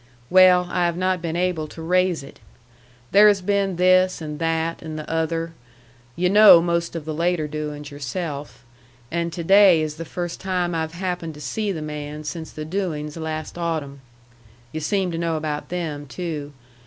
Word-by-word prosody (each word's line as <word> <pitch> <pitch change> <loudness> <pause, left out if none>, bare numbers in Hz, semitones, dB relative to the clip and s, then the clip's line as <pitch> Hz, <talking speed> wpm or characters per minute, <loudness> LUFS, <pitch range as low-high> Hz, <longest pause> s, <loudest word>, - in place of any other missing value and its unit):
"Well, 180 -1 +6
I 175 -1 +2
have 170 0 -2
not 185 -1 0
been 165 -1 -3
able 175 -3 -1
to 160 - -12
raise 180 -1 +1
it. 140 - -13 0.7
There 210 +1 +7
has 205 -2 +4
been 195 0 0
this 185 +1 +4
and 150 -2 -6
that 165 0 -1
and 155 -1 -6
the 155 - -7
other, 165 0 -2 0.6
yu' 180 - +1
know 205 -2 +8
most 170 0 -1
of 160 -3 -5
the 155 - -3
later 170 -1 0
doings 150 -1 -5
yourself, 145 +1 -5 0.5
and 170 0 -1
to 170 0 -5
day 195 -1 +6
is 155 0 -3
the 165 - -5
first 175 +1 -5
time 180 -2 -1
I've 160 -1 -2
happened 175 -3 -4
to - - -11
see 200 +9 -2
the 160 -5 -4
man 150 0 -6
since 160 +2 -6
the 155 - -7
doings 155 -4 -3
last 160 0 -5
autumn. 155 -5 -3 0.7
Yu' 155 - -4
seem 185 +4 0
to 165 - -3
know 165 -1 0
about 150 -1 -4
them, 155 -5 -4
too. 150 -2 -5
165 Hz, 180 wpm, -23 LUFS, 155-180 Hz, 0.7 s, know